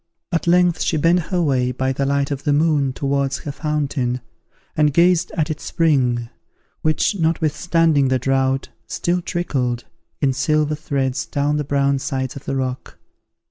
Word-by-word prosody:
At 170 -1 -1
length 175 0 +3
she 160 - +1
bent 170 +4 +3
her 180 - 0
way, 130 -4 +1
by 130 +1 -1
the 135 +1 -1
light 140 0 0
of 140 -1 -3
the 145 - +2
moon, 145 -3 +2
towards 140 0 -1
her 150 - -4
fountain, 140 -4 -1 0.6
and 150 -1 +3
gazed 170 +3 +3
at 155 -1 0
its 155 - -6
spring, 125 -8 +1 0.5
which, 155 +6 +1
notwithstanding 160 -2 +2
the 130 0 +2
drought, 135 +1 0 0.2
still 180 +1 -1
trickled, 130 -9 -2 0.4
in 135 -2 +2
silver 150 +3 +1
threads 140 -4 -2
down 145 +1 0
the 150 - -1
brown 140 0 +1
sides 130 -2 -3
of 140 - -9
the 135 - -2
rock. 130 -1 -4
140 Hz, 160 wpm, -20 LUFS, 135-160 Hz, 0.6 s, length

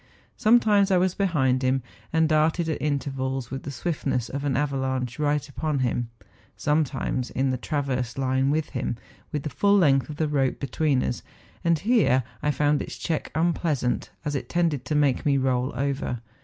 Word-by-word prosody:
Sometimes 215 -3 +4
I 190 - +4
was 185 0 +2
behind 140 -11 +1
him, 130 0 +1 0.3
and 160 0 +3
darted 160 +2 +2
at 160 - -2
intervals 135 -3 -2
with 135 0 -4
the - - -7
swiftness 135 -4 -2
of 140 +1 -4
an 140 -3 0
avalanche 130 -3 -1
right 145 -1 +1
upon 150 +1 -2
him, 120 -2 -1 0.5
sometimes 140 -4 0
in 135 0 0
the 130 - -1
transverse 130 -3 -2
line 130 0 +1
with 155 +1 0
him, 125 -2 -2 0.3
with 150 -2 -2
the 150 - -4
full 200 +9 +3
length 140 -7 +3
of 150 - -5
the 155 +1 0
rope 135 -3 0
between 140 0 +1
us; 120 - -2 0.4
and 170 -1 +3
here 200 - +3 0.2
I 150 - 0
found 150 0 +2
its - - -6
check 160 -3 -2
unpleasant, 160 -6 0 0.2
as 145 - -1
it 140 - -3
tended 165 -6 0
to 155 - -1
make 145 -3 +2
me 140 -2 +3
roll 130 0 +1
over. 135 -2 -2
140 Hz, 180 wpm, -25 LUFS, 130-155 Hz, 0.5 s, Sometimes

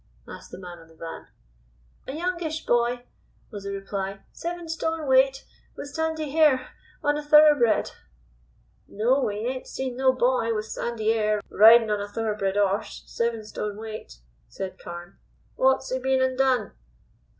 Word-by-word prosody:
asked - - -10
the - - -9
man 180 -2 -9
on 165 - -16
the 160 - -20
van. 165 0 -8 0.8
"A 270 - -5
youngish 340 -2 -3
boy," 240 +1 +1 0.5
was 205 -3 -8
the 200 - -3
reply, 195 0 -4
"seven 345 0 -6
stone 320 -1 -2
weight, 270 0 +3 0.3
with 285 - -6
sandy 315 0 -2
hair, 285 -4 +3 0.3
on 295 0 +1
a - - -7
thoroughbred." 295 -6 +5 1.0
"No; 245 +7 +1
we 210 +1 -2
ain't 255 +1 -4
seen 260 -2 -4
no 260 0 +4
boy 250 -3 +1
with 215 0 -2
sandy 220 -1 -1
'air, 215 -1 +1
ridin' 225 +1 +7
of 210 - +1
a 205 - -4
thoroughbred 205 -2 -2
'orse 200 0 0
seven 230 -1 -2
stone 210 -1 -5
weight," 215 - -8 0.3
said 190 -1 -7
Carne. 175 +2 -9 0.4
"What's 265 0 +2
'e 260 - 0
been 265 0 +1
an' 260 0 0
done?" 260 -2 +1
240 Hz, 155 wpm, -25 LUFS, 210-270 Hz, 1.0 s, ridin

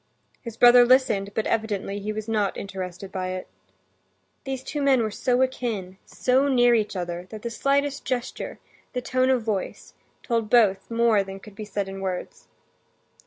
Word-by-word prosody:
His 230 -2 -8
brother 245 +1 +8
listened, 240 -6 +3
but 220 - 0
evidently 205 -3 -1
he 210 +1 -3
was 215 0 -5
not 210 -3 0
interested 190 -1 -6
by 185 -1 -3
it. 185 - -6 1.0
These 265 -1 -4
two 295 +1 -4
men 270 -4 +4
were 215 - -2
so 250 +4 +1
akin, 215 -8 -3
so 260 +2 +2
near 245 -3 +4
each 215 -2 +1
other, 175 0 -4
that 215 -1 -9
the 235 - -3
slightest 280 +4 0
gesture, 255 -1 -4 0.4
the 250 - -2
tone 255 0 +1
of 255 -3 +2
voice, 210 -4 -4 0.3
told 230 -3 -1
both 205 -5 +3
more 230 -3 +3
than 195 0 -8
could 210 +1 -13
be 215 +1 -7
said 200 -1 -3
in 195 0 -7
words. 195 - -5
220 Hz, 170 wpm, -25 LUFS, 195-250 Hz, 1.0 s, brother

